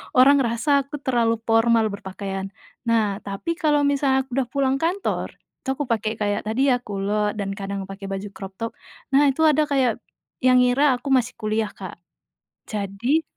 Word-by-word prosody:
orang 275 +3 +7
ngerasa 270 +3 +1
aku 290 - -6
terlalu 235 -3 +2
formal 225 -1 +3
berpakaian. 195 0 -5 0.4
Nah, 215 -4 +2
tapi 200 - -4
kalau 295 -3 +3
misalnya 275 -2 +2
aku 265 - -28
udah 255 - -1
pulang 270 +1 0
kantor, 350 +6 -2 0.2
itu - - -17
aku 290 - -2
pakai 225 -4 -1
kayak 205 -1 -1
tadi 260 +5 +2
ya, 245 - +2
kulot 210 -1 -1
dan 200 -2 -3
kadang 195 0 -4
pakai 195 +1 -8
baju 195 +1 -4
crop 195 -1 -9
top. 230 +3 -4 0.4
Nah, 285 +2 +5
itu 275 +4 +1
ada 305 -1 +4
kayak 265 -5 +1 0.4
yang 255 -1 +5
ngira 260 +2 +3
aku 265 +3 -5
masih 250 -2 +2
kuliah, 215 0 -1
Kak, 185 -3 -9 0.7
jadi 215 +9 -1
235 Hz, 170 wpm, -23 LUFS, 205-275 Hz, 0.7 s, orang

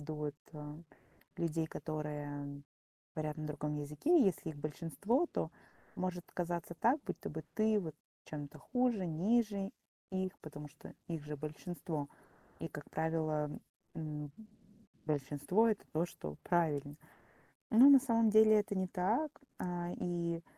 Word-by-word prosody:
виду, 155 +1 -4
вот, 150 -1 -2 0.2
э, 150 -1 -7 0.6
людей, 165 -1 0
которые 145 -2 -4 0.5
говорят 155 0 -2
на 155 - -3
другом 150 0 -2
языке, 150 - +3
и 265 - +7
если 170 -3 +1
их 150 - -7
большинство, 170 - 0
то - - -2 0.4
может 180 -1 -2
казаться 170 -1 -2
так, 250 - +4
будто - - -4
бы 160 0 -5
ты 215 -1 +4
вот 160 -5 -5 0.3
чем-то 145 0 -6
хуже, 245 - +1
ниже 200 +4 +2 0.4
их, 185 -1 -1
потому 150 -1 -8
что 145 +1 -12
их 165 -3 -3
же 150 0 -4
большинство. 155 0 -4 0.5
И, - - -3
как - - -9
правило, 155 -2 0 0.5
м, 150 -2 -4 0.7
большинство- 150 +9 +2
это 215 - -1
то, 160 +2 +2
что 75 - -7
правильно. 150 -5 +1 0.8
Но 250 +6 +10
на 275 -1 +10
самом 230 -4 +4
деле 215 0 +8
это 205 0 -2
не 190 -1 +1
так. 220 +12 +1 0.3
А, 175 -1 -2
и 170 -1 -1
165 Hz, 140 wpm, -36 LUFS, 150-195 Hz, 0.8 s, Но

